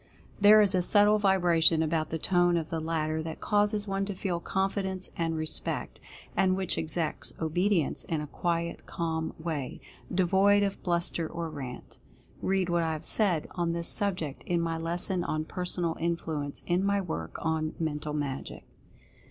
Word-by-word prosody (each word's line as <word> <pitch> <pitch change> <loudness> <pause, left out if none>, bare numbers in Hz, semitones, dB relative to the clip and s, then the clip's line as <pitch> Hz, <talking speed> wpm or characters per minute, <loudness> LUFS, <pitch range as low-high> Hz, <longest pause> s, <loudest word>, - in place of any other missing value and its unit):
There 210 +1 +8
is 205 -1 +5
a 185 - +3
subtle 205 +3 +5
vibration 175 -5 +4
about 155 0 0
the 160 - -2
tone 175 +1 +2
of 160 -2 -3
the 165 - -1
latter 160 -1 -1
that 160 0 -6
causes 205 0 +1
one 195 0 -1
to 200 -1 -5
feel 180 -2 -2
confidence 190 +1 -2
and 165 -1 -1
respect, 155 0 -3 0.4
and 185 -1 +3
which 190 -2 -1
exacts 160 0 -2
obedience 175 +1 +1
in 160 - -1
a 150 - -4
quiet, 170 +2 -2
calm 160 -1 -3
way, 160 -5 -4 0.3
devoid 195 +3 +4
of 200 -1 -2
bluster 170 -2 0
or 165 0 -5
rant. 130 -4 -8 0.4
Read 190 -1 +1
what 175 -1 +1
I 160 -1 0
have 155 0 -6
said 185 -8 +2
on 170 -2 -1
this 170 0 +2
subject, 180 -9 0
in 175 -1 +1
my 165 -1 -1
lesson 175 +2 -1
on 155 -1 -2
"Personal 175 -1 0
Influence" 160 -4 -3
in 180 +2 +1
my 200 0 +2
work 85 - -4
on 160 -1 -1
"Mental 150 -2 -2
Magic." 140 -3 -4
170 Hz, 165 wpm, -29 LUFS, 160-190 Hz, 0.4 s, There